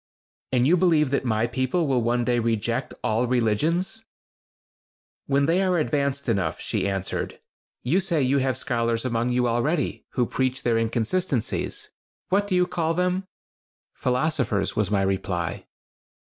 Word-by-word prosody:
"And 125 Hz, -1 st, +3 dB
you 165 Hz, +6 st, +5 dB
believe 160 Hz, -6 st, +3 dB
that 140 Hz, -, 0 dB
my 110 Hz, -1 st, +1 dB
people 130 Hz, +8 st, 0 dB
will 130 Hz, -4 st, +1 dB
one 120 Hz, +1 st, +1 dB
day 120 Hz, 0 st, +2 dB
reject 115 Hz, +2 st, -1 dB
all 115 Hz, +3 st, +1 dB
religions?" 150 Hz, -, 0 dB, 1.2 s
"When 140 Hz, 0 st, +2 dB
they 170 Hz, +5 st, +2 dB
are 185 Hz, -2 st, +2 dB
advanced 140 Hz, -3 st, 0 dB
enough," 95 Hz, -9 st, 0 dB
she 100 Hz, -, -1 dB
answered. 95 Hz, -1 st, -3 dB, 0.4 s
"You 150 Hz, +10 st, +2 dB
say 170 Hz, -6 st, +1 dB
you 135 Hz, +2 st, +2 dB
have 130 Hz, -1 st, 0 dB
scholars 115 Hz, -3 st, -1 dB
among 120 Hz, -1 st, 0 dB
you 125 Hz, 0 st, +2 dB
already, 135 Hz, +6 st, -1 dB
who 125 Hz, -, +2 dB
preach 130 Hz, +1 st, -1 dB
their 115 Hz, -2 st, +2 dB
inconsistencies. 115 Hz, +4 st, -1 dB, 0.4 s
What 200 Hz, +2 st, +2 dB
do 190 Hz, -, 0 dB
you 180 Hz, 0 st, +4 dB
call 165 Hz, -2 st, -1 dB
them?" 180 Hz, +2 st, 0 dB, 0.7 s
"Philosophers," 125 Hz, -6 st, 0 dB
was 105 Hz, -3 st, +1 dB
my 100 Hz, -2 st, +2 dB
reply. 95 Hz, -3 st, -2 dB
130 Hz, 150 wpm, -25 LUFS, 115-160 Hz, 1.2 s, you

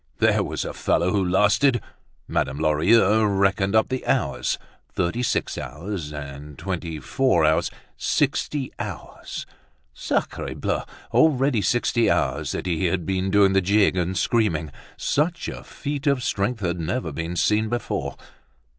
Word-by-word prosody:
There -, -, +3 dB
was -, -, -3 dB
a -, -, -4 dB
fellow 90 Hz, +2 st, +1 dB
who 100 Hz, -1 st, +2 dB
lasted! 105 Hz, +8 st, +3 dB, 0.5 s
Madame 65 Hz, +2 st, -1 dB
Lorilleux 95 Hz, +8 st, +4 dB
reckoned 100 Hz, 0 st, +2 dB
up 110 Hz, -, +4 dB
the 130 Hz, 0 st, -2 dB
hours; -, -, 0 dB, 0.3 s
thirty 90 Hz, +7 st, -1 dB
six 125 Hz, -, -1 dB
hours 80 Hz, -1 st, -5 dB
and 70 Hz, 0 st, -8 dB
twenty 85 Hz, -2 st, -4 dB
four 85 Hz, -, +2 dB
hours, 80 Hz, 0 st, +2 dB, 0.3 s
sixty 140 Hz, -3 st, 0 dB
hours. -, -, -6 dB, 0.5 s
Sacre -, -, -2 dB
Dieu! -, -, -1 dB, 0.3 s
already 135 Hz, -6 st, +3 dB
sixty 120 Hz, +3 st, +2 dB
hours 70 Hz, +3 st, 0 dB
that -, -, -4 dB
he 90 Hz, 0 st, 0 dB
had 85 Hz, -1 st, 0 dB
been 95 Hz, +1 st, -1 dB
doing 100 Hz, -1 st, +4 dB
the 95 Hz, -, +4 dB
jig 100 Hz, +1 st, +3 dB
and 90 Hz, +1 st, -1 dB
screaming! 85 Hz, -10 st, +1 dB, 0.3 s
Such 165 Hz, +4 st, 0 dB
a -, -, -6 dB
feat 145 Hz, 0 st, -5 dB
of 140 Hz, -3 st, +2 dB
strength 110 Hz, +1 st, -1 dB
had 90 Hz, -2 st, -1 dB
never 85 Hz, +2 st, -2 dB
been 80 Hz, +4 st, -4 dB
seen 105 Hz, +4 st, +2 dB
before. 120 Hz, +1 st, -3 dB
95 Hz, 145 wpm, -24 LUFS, 85-115 Hz, 0.5 s, Lorilleux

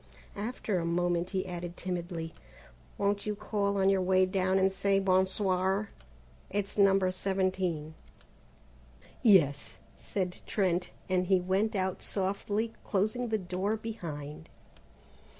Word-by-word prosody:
After 210 Hz, -2 st, -2 dB
a -, -, -2 dB
moment 175 Hz, +1 st, 0 dB
he 190 Hz, -1 st, -1 dB
added 175 Hz, -1 st, -6 dB
timidly: 175 Hz, -2 st, -4 dB, 0.6 s
"Won't 200 Hz, +1 st, 0 dB
you 210 Hz, -, -1 dB
call 200 Hz, -1 st, -1 dB
on 190 Hz, 0 st, +3 dB
your 195 Hz, -1 st, +4 dB
way 185 Hz, 0 st, +4 dB
down 185 Hz, 0 st, +1 dB
and 190 Hz, 0 st, +3 dB
say 195 Hz, 0 st, +2 dB
bon 190 Hz, -1 st, +3 dB
soir? 190 Hz, +1 st, +1 dB, 0.6 s
It's 200 Hz, 0 st, -2 dB
No. 195 Hz, -1 st, +5 dB
17." 185 Hz, -4 st, -1 dB, 1.3 s
"Yes," 145 Hz, -, +4 dB, 0.2 s
said 185 Hz, -3 st, -3 dB
Trent, 185 Hz, -3 st, +1 dB, 0.2 s
and 185 Hz, -1 st, +1 dB
he 190 Hz, -1 st, +4 dB
went 195 Hz, +5 st, 0 dB
out 190 Hz, -1 st, -1 dB
softly 205 Hz, +3 st, -1 dB
closing 215 Hz, +5 st, 0 dB
the 220 Hz, -1 st, +1 dB
door 190 Hz, +3 st, -2 dB
behind. 160 Hz, -8 st, -7 dB
190 Hz, 125 wpm, -30 LUFS, 180-200 Hz, 1.3 s, No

